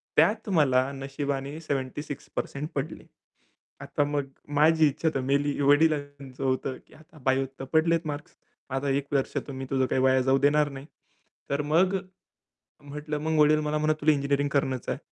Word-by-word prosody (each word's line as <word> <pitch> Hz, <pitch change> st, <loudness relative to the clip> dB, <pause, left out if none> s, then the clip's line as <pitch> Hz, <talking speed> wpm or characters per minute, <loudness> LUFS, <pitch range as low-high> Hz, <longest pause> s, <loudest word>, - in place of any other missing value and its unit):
त्यात 215 Hz, 0 st, +3 dB
मला 135 Hz, -6 st, +3 dB
नशिबाने 140 Hz, +2 st, -4 dB
76% 145 Hz, +1 st, -4 dB
पडले. 145 Hz, +3 st, -4 dB, 0.8 s
आता 145 Hz, -, -1 dB
मग 145 Hz, -1 st, -1 dB, 0.4 s
माझी 160 Hz, 0 st, +5 dB
इच्छा 155 Hz, +3 st, -1 dB
तर 135 Hz, -, 0 dB
मेली, 140 Hz, +2 st, 0 dB
वडिलांचं 145 Hz, -2 st, +1 dB
होतं 130 Hz, 0 st, -1 dB
की -, -, -20 dB
"आता 155 Hz, 0 st, -18 dB
बायोत 135 Hz, 0 st, +2 dB
तर -, -, -3 dB
पडलेत 165 Hz, +1 st, +2 dB
मार्क्स, 150 Hz, 0 st, -6 dB, 0.3 s
आता 135 Hz, +2 st, -2 dB
1 140 Hz, +1 st, 0 dB
वर्ष 135 Hz, -2 st, +1 dB, 0.2 s
तर -, -, -5 dB
मी 135 Hz, 0 st, -5 dB
तुझं 130 Hz, -1 st, +2 dB
काही 130 Hz, +1 st, 0 dB
वाया 130 Hz, 0 st, +4 dB
जाऊ 135 Hz, +1 st, +3 dB
देणार 145 Hz, +1 st, +3 dB
नाही." 135 Hz, +1 st, -9 dB, 0.6 s
तर 140 Hz, +1 st, 0 dB
मग 180 Hz, +6 st, +3 dB, 0.9 s
म्हटलं 150 Hz, +1 st, -5 dB
मग 160 Hz, 0 st, 0 dB
वडील 150 Hz, +1 st, +5 dB
मला 150 Hz, 0 st, -1 dB
म्हणत, 155 Hz, 0 st, +2 dB
"तुला 155 Hz, +1 st, +4 dB
इंजिनिअरिंग 140 Hz, 0 st, 0 dB
करणंच 135 Hz, -3 st, -1 dB
आहे." -, -, -1 dB
145 Hz, 165 wpm, -27 LUFS, 135-155 Hz, 0.9 s, माझी